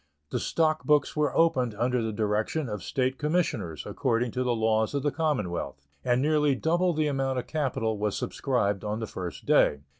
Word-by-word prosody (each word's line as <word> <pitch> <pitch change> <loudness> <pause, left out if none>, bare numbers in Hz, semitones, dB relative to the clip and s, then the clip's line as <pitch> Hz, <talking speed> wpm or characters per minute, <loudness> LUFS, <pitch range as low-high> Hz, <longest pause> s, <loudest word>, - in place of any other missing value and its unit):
The - - -1
stock 155 -1 +1
books 150 -1 +2
were 150 -1 0
opened 130 -9 +2
under 125 +3 +1
the 110 -1 -2
direction 110 +7 -1
of 105 -3 -4
State 130 -1 -1
Commissioners, 150 - -1
according 120 -1 0
to 125 - -2
the 125 -1 +1
laws 110 +2 +1
of 140 - -1
the 145 - +1
Commonwealth, 105 - -2 0.2
and 120 0 +2
nearly 150 -2 +3
double 175 +6 +1
the 155 -2 0
amount 135 -2 0
of 125 - -2
capital 120 -8 -1
was 105 -1 -1
subscribed 105 -7 -1
on 105 +1 -2
the 110 - -3
first 90 -4 -7
day. 70 - +3
125 Hz, 185 wpm, -27 LUFS, 110-150 Hz, 0.2 s, nearly